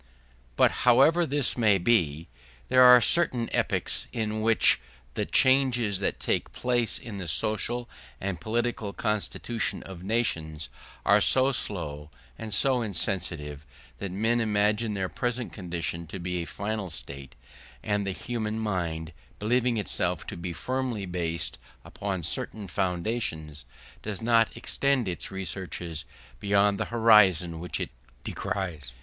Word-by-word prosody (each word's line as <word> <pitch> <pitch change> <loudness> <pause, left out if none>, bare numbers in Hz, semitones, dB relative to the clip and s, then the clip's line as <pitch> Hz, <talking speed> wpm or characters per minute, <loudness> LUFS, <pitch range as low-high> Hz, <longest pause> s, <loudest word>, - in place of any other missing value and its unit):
But - - +4
however 145 +8 +5
this 140 -1 +2
may 110 -5 +4
be, 85 -6 +1 0.4
there 130 0 +5
are 125 -1 +9
certain 125 -6 +2
epochs - - 0
at 110 -2 -1
which 110 0 +3 0.3
the - - -2
changes 125 -6 +3
that 100 - -2
take - - -1
place 120 -2 0
in 105 -4 -7
the 90 - -5
social 110 +9 0 0.3
and 95 -4 -4
political 110 0 -2
constitution 110 +2 -2
of 95 -3 -10
nations 85 -8 -1 0.4
are - - +5
so 130 +1 +4
slow 75 - -3 0.3
and 110 +6 -7
so 125 +5 +2
insensible 90 -7 -2 0.4
that 100 - -5
men 115 +5 +1
imagine 105 0 +1
their 95 -1 -1
present 120 +3 -3
condition 85 -3 -4
to 85 - -7
be 90 0 -3
a - - -5
final 105 -1 -4
state; 70 -5 -8 0.5
and 105 -1 0
the - - 0
human 110 +1 -4
mind, 85 -7 -3 0.2
believing 120 +2 +1
itself 90 -4 -1
to - - -7
be 85 +1 -5
firmly 125 +1 -3
based 85 -6 -2 0.3
upon 95 -3 -4
certain 100 +5 +3
foundations, 85 - -2 0.4
does 105 -3 -5
not 115 -1 +2
extend 130 0 0
its 90 - -3
researches 90 -4 -5 0.3
beyond 100 +1 +2
the - - 0
horizon 100 -8 +4
which 90 +1 -3
it - - -4 0.3
descries. 80 -10 -4
100 Hz, 135 wpm, -27 LUFS, 85-115 Hz, 0.5 s, are